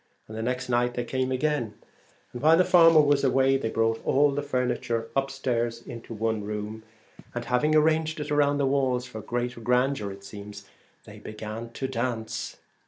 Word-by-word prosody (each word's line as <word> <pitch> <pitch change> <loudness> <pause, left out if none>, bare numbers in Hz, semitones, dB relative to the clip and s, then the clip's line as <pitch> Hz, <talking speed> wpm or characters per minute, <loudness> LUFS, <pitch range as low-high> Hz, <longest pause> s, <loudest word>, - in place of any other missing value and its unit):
The 110 +1 -6
next 125 +2 -2
night 120 0 +1
they 120 - -1
came 130 +2 -2
again, 130 -5 -1 0.6
and 120 - -6
while 160 +3 +6
the 185 - +4
farmer 165 -3 +7
was 145 -1 +2
away, 135 0 +3
brought 115 -2 -1
all 145 +1 +3
the 140 +1 -2
furniture 125 -4 -2
up 135 0 +1
stairs 120 -3 -2
into 115 -2 -8
one 110 -1 -1
room, 105 +1 -5 0.5
and 120 0 -3
having 125 +6 +2
arranged 160 0 +2
it 150 0 -5
round 145 -1 +2
the 140 - +2
walls, 130 -2 +1
for 110 - -8
the 105 - -19
greater 120 0 -3
grandeur 125 -2 +1
it 100 0 -11
seems, 100 0 -10 0.4
they - - -12
began 110 +2 -7
to 135 - -3
dance. 120 -3 -3
125 Hz, 175 wpm, -26 LUFS, 115-140 Hz, 0.6 s, farmer